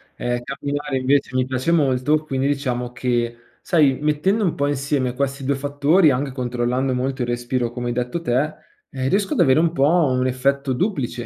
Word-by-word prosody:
ehm, 120 Hz, 0 st, -2 dB
camminare 140 Hz, +1 st, -3 dB
invece 130 Hz, 0 st, +1 dB
mi 130 Hz, 0 st, +2 dB
piace 130 Hz, +5 st, -1 dB
molto, 150 Hz, 0 st, +2 dB
quindi 135 Hz, -2 st, -1 dB
diciamo 125 Hz, -4 st, -2 dB
che, 120 Hz, -1 st, -1 dB, 0.2 s
sai, 145 Hz, -7 st, +2 dB
mettendo 155 Hz, +9 st, +1 dB
un 175 Hz, -, 0 dB
po' 140 Hz, -, 0 dB
insieme 140 Hz, -2 st, -1 dB
questi 140 Hz, +1 st, -2 dB
2 140 Hz, +2 st, +1 dB
fattori, 145 Hz, +5 st, +3 dB
anche 135 Hz, +1 st, -1 dB
controllando 125 Hz, +1 st, -1 dB
molto 130 Hz, +1 st, -2 dB
il 120 Hz, -, -1 dB
respiro, 120 Hz, 0 st, -1 dB
come 120 Hz, 0 st, -4 dB
hai 120 Hz, -, -1 dB
detto 125 Hz, +7 st, -2 dB
te, 125 Hz, -1 st, +2 dB, 0.5 s
ehm, 130 Hz, -1 st, -3 dB
riesco 195 Hz, +4 st, +1 dB
ad -, -, +2 dB
avere 135 Hz, +2 st, +4 dB
un 165 Hz, 0 st, +2 dB
po' 140 Hz, -4 st, +2 dB
un 145 Hz, -7 st, +2 dB
effetto 135 Hz, +1 st, 0 dB
duplice, 125 Hz, -, -2 dB
135 Hz, 185 wpm, -21 LUFS, 125-145 Hz, 0.5 s, avere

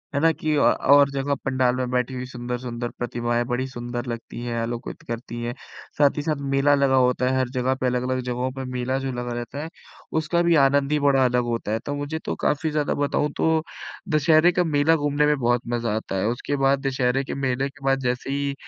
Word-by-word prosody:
है -, -, +2 dB
ना 165 Hz, 0 st, +5 dB
कि 155 Hz, 0 st, -1 dB
अ, 145 Hz, -, +3 dB
और 140 Hz, 0 st, +5 dB
जगह 140 Hz, +1 st, -1 dB
पंडाल 130 Hz, -2 st, +2 dB
में 125 Hz, -1 st, -2 dB
बैठी 125 Hz, +1 st, 0 dB
हुई 125 Hz, 0 st, -4 dB
सुंदर-सुंदर 120 Hz, -1 st, -5 dB
प्रतिमाएँ 120 Hz, 0 st, -1 dB
बड़ी 125 Hz, +1 st, -1 dB
सुंदर 120 Hz, -1 st, -5 dB
लगती 120 Hz, 0 st, -6 dB
हैं, 120 Hz, -1 st, -3 dB
आलोकित 115 Hz, +1 st, -5 dB
करती 120 Hz, 0 st, -5 dB
है। 120 Hz, -, -3 dB, 0.4 s
साथ 145 Hz, 0 st, +3 dB
ही -, -, 0 dB
साथ 150 Hz, -2 st, -2 dB
मेला 140 Hz, +1 st, +4 dB
लगा 140 Hz, -1 st, +3 dB
होता 125 Hz, 0 st, +3 dB
है 130 Hz, -, +1 dB
हर 130 Hz, -1 st, 0 dB
जगह 130 Hz, +1 st, 0 dB
पे, 130 Hz, -, -3 dB
अलग-अलग 125 Hz, +1 st, 0 dB
जगहों 125 Hz, +1 st, -2 dB
पर 135 Hz, 0 st, -6 dB
मेला 125 Hz, +1 st, -1 dB
जो 135 Hz, -1 st, -3 dB
लगा 120 Hz, 0 st, -4 dB
रहता 120 Hz, +4 st, -5 dB
है 160 Hz, -, -6 dB, 0.5 s
उसका 170 Hz, +2 st, 0 dB
भी 170 Hz, -1 st, +4 dB
आनंद 140 Hz, +1 st, +2 dB
ही 150 Hz, -, +3 dB, 0.2 s
अलग 125 Hz, -1 st, +2 dB
होता 115 Hz, -3 st, -3 dB
है। 110 Hz, -, 0 dB
तो 145 Hz, -, -2 dB
मुझे 145 Hz, +2 st, -4 dB
तो -, -, -2 dB
काफ़ी 150 Hz, +2 st, +1 dB
ज़्यादा 150 Hz, -1 st, 0 dB
बताऊँ 145 Hz, +1 st, 0 dB
तो 160 Hz, -1 st, +2 dB, 0.5 s
दशहरे 155 Hz, +2 st, +4 dB
का 180 Hz, 0 st, +1 dB
मेला 155 Hz, 0 st, +3 dB
घूमने 145 Hz, -1 st, +1 dB
में 150 Hz, 0 st, +3 dB
बहुत 120 Hz, -1 st, +2 dB
मज़ा 115 Hz, -3 st, -1 dB
आता 110 Hz, -3 st, -4 dB
है। 95 Hz, +1 st, 0 dB
उसके 120 Hz, +4 st, -2 dB
बाद 135 Hz, 0 st, +3 dB
दशहरे 130 Hz, 0 st, +1 dB
के -, -, -5 dB
मेले 130 Hz, +2 st, 0 dB
के 140 Hz, 0 st, -14 dB
बाद 135 Hz, 0 st, +3 dB
जैसे 125 Hz, 0 st, -2 dB
ही 140 Hz, 0 st, -1 dB
130 Hz, 220 wpm, -24 LUFS, 125-145 Hz, 0.5 s, ना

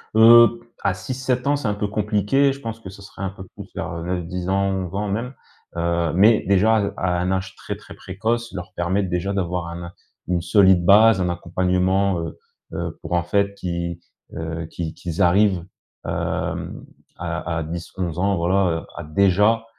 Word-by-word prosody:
Heu, 115 Hz, +1 st, +8 dB, 0.2 s
à 100 Hz, -2 st, +2 dB
6-7 125 Hz, +5 st, -2 dB
ans 145 Hz, -, +3 dB
c'est 140 Hz, -6 st, -3 dB
un 105 Hz, -, +1 dB
peu 105 Hz, 0 st, -2 dB
compliqué, 105 Hz, +7 st, +1 dB
je 135 Hz, -, -11 dB
pense 115 Hz, 0 st, -5 dB
que 100 Hz, -, -10 dB
ce 95 Hz, +2 st, -12 dB
serait 100 Hz, 0 st, -9 dB
un 95 Hz, -, -1 dB
peu 95 Hz, -1 st, -10 dB
plus -, -, -10 dB
vers -, -, -4 dB
9-10 90 Hz, 0 st, -3 dB
ans 95 Hz, 0 st, +1 dB
ou 95 Hz, -1 st, -2 dB
11 90 Hz, -, -9 dB
ans 105 Hz, +1 st, -1 dB
même, 115 Hz, +6 st, -3 dB, 0.4 s
heu, 85 Hz, -1 st, 0 dB
mais 105 Hz, +5 st, +5 dB
déjà, 105 Hz, +3 st, +4 dB
heu, 100 Hz, 0 st, -2 dB
à 90 Hz, -1 st, 0 dB
un 90 Hz, +1 st, 0 dB
âge 95 Hz, 0 st, -2 dB
très -, -, -6 dB
très -, -, -13 dB
précoce, 115 Hz, +5 st, -3 dB
leur 90 Hz, -2 st, -7 dB
permettre 95 Hz, +2 st, -1 dB
déjà 90 Hz, +3 st, -1 dB
d'avoir 90 Hz, -3 st, -2 dB
un 85 Hz, +1 st, -7 dB, 0.4 s
une 90 Hz, -1 st, +1 dB
solide 95 Hz, -2 st, +4 dB
base, 105 Hz, 0 st, +6 dB
un 90 Hz, -, 0 dB
accompagnement, 90 Hz, +2 st, +1 dB
heu, 85 Hz, 0 st, -5 dB, 0.4 s
heu, -, -, -4 dB
pour 80 Hz, -, -5 dB
en 85 Hz, 0 st, +2 dB
fait 100 Hz, +3 st, +1 dB
qu'ils, 85 Hz, -2 st, -4 dB, 0.3 s
heu, 80 Hz, 0 st, -4 dB
qu'ils 80 Hz, -1 st, -5 dB
qu'ils 85 Hz, -2 st, -5 dB
arrivent, 95 Hz, 0 st, +3 dB, 0.4 s
hem, -, -, -3 dB, 0.3 s
à 85 Hz, -1 st, -3 dB
à 80 Hz, -, -2 dB
10-11 85 Hz, +1 st, -5 dB
ans 100 Hz, +1 st, +2 dB
voilà 85 Hz, -1 st, +1 dB
à 85 Hz, -, -6 dB
déjà, 100 Hz, +7 st, +3 dB
95 Hz, 185 wpm, -22 LUFS, 85-105 Hz, 0.4 s, Heu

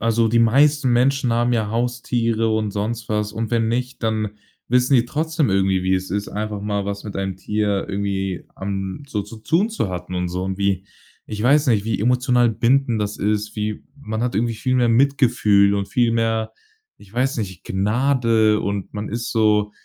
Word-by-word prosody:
also 115 Hz, 0 st, +2 dB
die 115 Hz, -, +2 dB
meisten 140 Hz, +5 st, +4 dB
Menschen 130 Hz, 0 st, +2 dB
haben 120 Hz, +1 st, +1 dB
ja 110 Hz, -3 st, 0 dB
Haustiere 115 Hz, -1 st, 0 dB
und 110 Hz, -1 st, 0 dB
sonst 110 Hz, +3 st, -3 dB
was, 105 Hz, -1 st, 0 dB
und 110 Hz, 0 st, -3 dB
wenn 115 Hz, -2 st, +1 dB
nicht, 125 Hz, +2 st, -3 dB
dann 110 Hz, -2 st, 0 dB, 0.4 s
wissen 125 Hz, +2 st, +3 dB
die 120 Hz, -2 st, +4 dB
trotzdem 155 Hz, -, -1 dB
irgendwie, 95 Hz, -1 st, +2 dB
wie 95 Hz, +1 st, +2 dB
es 95 Hz, -1 st, -3 dB
ist, 100 Hz, +1 st, -2 dB
einfach 105 Hz, 0 st, -4 dB
mal 100 Hz, -1 st, -2 dB
was 100 Hz, +1 st, -4 dB
mit 105 Hz, -, -7 dB
einem 95 Hz, -1 st, -3 dB
Tier 105 Hz, -1 st, -1 dB
irgendwie 95 Hz, -2 st, -2 dB
am 95 Hz, +4 st, -4 dB
so 105 Hz, -6 st, -2 dB
zu 105 Hz, +3 st, -11 dB
tun 170 Hz, -, +1 dB
zu 220 Hz, -, -2 dB
hatten 90 Hz, 0 st, -6 dB
und 90 Hz, 0 st, -1 dB
so 90 Hz, +1 st, -3 dB
und 95 Hz, 0 st, -3 dB
wie 100 Hz, -1 st, 0 dB, 0.4 s
ich 105 Hz, 0 st, -5 dB
weiß 145 Hz, +4 st, +4 dB
nicht, 105 Hz, -3 st, +2 dB
wie 110 Hz, -2 st, -1 dB
emotional 125 Hz, +1 st, +3 dB
bindend 120 Hz, +1 st, +1 dB
das 105 Hz, 0 st, -2 dB
ist, 105 Hz, 0 st, -1 dB
wie 105 Hz, 0 st, -3 dB, 0.2 s
man 110 Hz, -2 st, -4 dB
hat 125 Hz, -5 st, -1 dB
irgendwie 115 Hz, +2 st, 0 dB
viel 130 Hz, +4 st, -1 dB
mehr 125 Hz, -2 st, +3 dB
Mitgefühl 115 Hz, -6 st, +3 dB
und 100 Hz, -1 st, -1 dB
viel 120 Hz, +2 st, +2 dB
mehr, 115 Hz, -1 st, 0 dB, 0.5 s
ich 100 Hz, 0 st, -18 dB
weiß 130 Hz, +2 st, 0 dB
nicht, 95 Hz, -5 st, -5 dB
Gnade 110 Hz, +1 st, +2 dB
und 100 Hz, -1 st, -3 dB
man 105 Hz, 0 st, -4 dB
ist 120 Hz, +2 st, -4 dB
so 105 Hz, -2 st, +2 dB
110 Hz, 195 wpm, -21 LUFS, 100-120 Hz, 0.5 s, meisten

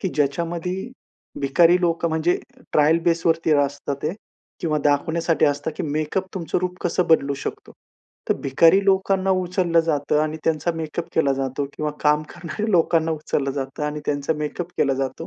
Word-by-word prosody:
की 190 Hz, -, -1 dB
ज्याच्यामध्ये 170 Hz, +5 st, -1 dB, 0.7 s
भिकारी 170 Hz, +6 st, +4 dB
लोकं, 170 Hz, -1 st, +1 dB
म्हणजे 160 Hz, +2 st, +1 dB, 0.3 s
ट्रायल 155 Hz, +2 st, +4 dB
बेसवरती 165 Hz, -1 st, +2 dB
असतात 145 Hz, -1 st, 0 dB
ते, 155 Hz, +3 st, -1 dB, 0.5 s
किंवा 155 Hz, -3 st, 0 dB
दाखवण्यासाठी 160 Hz, +3 st, +2 dB
असतं, 145 Hz, +1 st, 0 dB
की -, -, -3 dB
मेकअप 155 Hz, +5 st, -2 dB
तुमचं 170 Hz, -4 st, -1 dB
रूप 180 Hz, 0 st, -2 dB
कसं 175 Hz, +1 st, +1 dB
बदलू 140 Hz, -3 st, +4 dB
शकतो. -, -, -6 dB, 0.6 s
तर -, -, +3 dB
भिकारी 165 Hz, +8 st, +4 dB
लोकांना 195 Hz, 0 st, +2 dB
उचललं 180 Hz, -2 st, +2 dB
जातं. 150 Hz, -2 st, 0 dB
आणि 155 Hz, 0 st, -2 dB
त्यांचा 160 Hz, +1 st, +1 dB
मेकअप 165 Hz, +1 st, -4 dB
केला 140 Hz, -4 st, +3 dB
जातो. 135 Hz, +1 st, -2 dB
किंवा 150 Hz, -1 st, -1 dB
काम 150 Hz, 0 st, +3 dB
करणाऱ्या 195 Hz, +6 st, -5 dB
लोकांना 165 Hz, -3 st, +3 dB
उचललं 150 Hz, -3 st, -1 dB
जातं. 135 Hz, +1 st, -5 dB
आणि 150 Hz, 0 st, -3 dB
त्यांचा 145 Hz, +1 st, 0 dB
मेकअप 150 Hz, +3 st, -4 dB
केला 135 Hz, -1 st, +2 dB
जातो. 130 Hz, -1 st, -3 dB
160 Hz, 155 wpm, -22 LUFS, 145-170 Hz, 0.7 s, भिकारी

